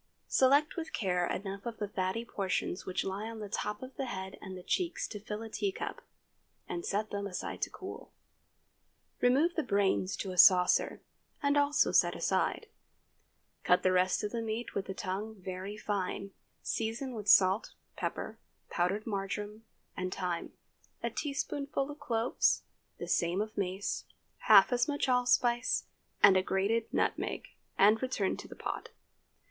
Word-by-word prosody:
Select 285 +5 +4
with 330 -1 -5
care 180 -4 0
enough 195 +2 -4
of 230 -2 -5
the 210 - -2
fatty 190 +4 -2
portions 190 -4 -2
which 185 - -1
lie 200 +3 -3
on 230 - -7
the 210 -1 -6
top 210 +2 -3
of 255 0 -9
the 270 -2 -2
head 190 -4 -5
and 190 -1 -7
the 180 - -10
cheeks 350 - -1
to 210 - -6
fill 210 +1 -5
a - - -6
teacup, 205 -3 -3 0.7
and 345 - -4
set 210 - -1
them 200 0 -2
aside 185 - -5
to - - 0
cool. - - -9 1.1
Remove 275 +8 +3
the 325 - 0
brains 200 -5 +1
to 195 - -4
a 180 - -3
saucer 180 0 +6 0.4
and 285 0 +3
also 290 0 +3
set - - +4
aside. - - 0 1.0
Chop 180 - +4
the 185 - +4
rest 185 0 +2
of 210 - -2
the 235 - -2
meat 225 +1 -4
with 195 - -3
the 190 - -5
tongue 205 +4 -4
very 190 +3 -6
fine, 200 -1 -3 0.3
season 230 +4 -2
with 210 -3 -6
salt, 190 +1 +5 0.2
pepper, - - -4 0.3
powdered 190 +5 0
marjoram 205 +1 -4 0.3
and 185 0 -3
thyme, 180 -3 -3 0.5
a - - -1
teaspoonful 280 -1 -2
of 290 - -11
cloves, 235 -4 +1 0.3
the - - -6
same 170 +2 +1
of 215 +1 -3
mace, 195 0 -2 0.4
half 210 +2 +8
as 245 0 +2
much 290 -2 0
allspice, 245 -1 +2 0.4
and 195 - +9
a 185 - +5
grated 200 +5 0
nutmeg, - - -1 0.3
and 210 +3 +5
return 255 -7 0
to - - -9
the - - -10
pot. - - -5
210 Hz, 160 wpm, -32 LUFS, 190-240 Hz, 1.1 s, and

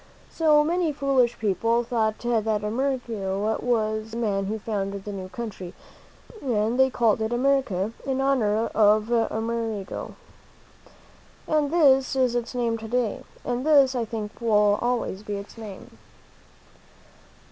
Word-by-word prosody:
So 305 -2 +4
many 340 +1 0
foolish 270 -4 +1
people 230 +3 +1
thought 220 -2 0
that 220 -3 0
Amerigo 220 -4 -1
was 215 -2 0
the 225 - -7
man 200 -4 0
who 215 +3 -2
found 200 -2 -3
the 200 +1 -6
new 190 -2 -6
country, 195 -5 -7 0.7
and 230 -1 0
they 265 0 +5
called 230 -4 +1
it 220 +1 -1
America, 240 -6 +1
in 270 -1 -2
honor 230 -5 +2
of 215 +1 +3
Amerigo. 225 -3 -2 1.3
And 305 -2 +1
this 270 -6 +4
is 255 -2 +2
its 240 +1 -3
name 230 -2 0
to 220 - -7
day; 240 -2 -1 0.2
and 245 +1 -2
this, 280 -3 +5
I 245 -2 -1
think, 215 -2 -5
will 210 -2 +3
always 240 -5 -1
be 210 -1 -5
its 200 0 -8
name. 215 -4 -10
230 Hz, 135 wpm, -25 LUFS, 210-255 Hz, 1.3 s, they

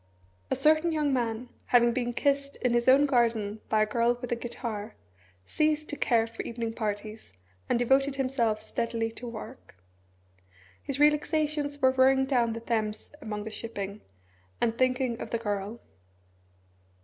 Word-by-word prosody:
A - - +1
certain 310 +2 +3
young 300 -3 +1
man, 240 -1 -2 0.2
having 240 -1 +4
been 240 -1 -1
kissed 280 +2 0
in 250 -2 +2
his 240 +1 +1
own 270 +3 +7
garden 225 -5 +1
by 215 0 +3
a - - +2
girl 235 +2 +1
with 245 -1 -6
a - - +2
guitar, 230 -3 -5 0.5
ceased 305 - 0
to - - -3
care 230 -5 +2
for 225 0 -7
evening 230 -1 -4
parties, 215 - -5 0.4
and - - +3
devoted 270 +3 +2
himself 255 -5 0
steadily 230 -1 -2
to 240 +2 -8
work. 230 - -9 1.1
His 275 -1 -4
relaxations 300 -1 +1
were 260 - +6
rowing 265 +1 +4
down 245 -4 +1
the 230 - -6
Thames 220 -2 -2
among 210 -1 -4
the 220 - -6
shipping, 205 -2 -6 0.6
and 230 -1 +1
thinking 255 -1 0
of - - -5
the 230 - 0
girl. 205 0 -3
240 Hz, 155 wpm, -28 LUFS, 225-270 Hz, 1.1 s, own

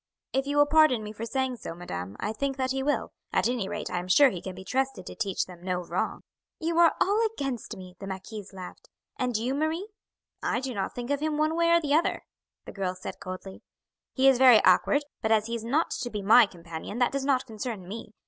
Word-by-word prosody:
"If 270 +1 0
you 290 +1 -1
will 290 - +7
pardon 300 -7 +4
me 210 - -6
for 220 +2 -6
saying 260 0 -1
so, 165 - -7
madam, 95 - -6
I 210 - -2
think 275 +4 -2
that 260 -1 0
he 265 0 -1
will 290 +2 0 0.2
at - - +2
any 235 -5 -1
rate - - -4
I 180 - -1
am 180 - -6
sure 270 +8 +6
he 180 - -6
can 190 -1 -7
be 190 - -9
trusted 265 +6 -1
to - - -7
teach 200 -4 -1
them 180 -2 -13
no 180 0 -2
wrong." - - -3 0.3
"You 330 +1 0
are 335 -1 +6
all 415 +4 +3
against 270 - -4
me," 185 -1 -11
the 195 - -7
marquise 195 +2 -7
laughed. 185 -2 -10 0.3
"And 250 -3 0
you, 240 +4 -1
Marie?" 315 +7 -1 0.5
"I - - 0
did 260 0 -4
not 200 -3 -3
think 245 +2 -4
of 285 - +1
him 305 0 -1
one 310 +1 +1
way 335 0 +3
or 340 0 +6
the 290 -3 -1
other," 320 +3 +2 0.4
the - - -8
girl 185 -2 -3
said 185 - -7
coldly. 185 +1 -8 0.5
"He 265 0 +3
is 265 -2 +5
very 250 -4 +8
awkward; 235 +10 +4 0.2
but 220 - 0
as 215 -1 +4
he 230 - -5
is 230 -2 -3
not 280 +8 +1
to 245 - -3
be 210 -3 -4
my 225 +3 +7
companion 170 +3 -8
that 245 -1 +2
does 275 -1 -2
not 270 -2 +1
concern 220 -4 -6
me. 220 +1 -8
240 Hz, 240 wpm, -27 LUFS, 195-275 Hz, 0.5 s, very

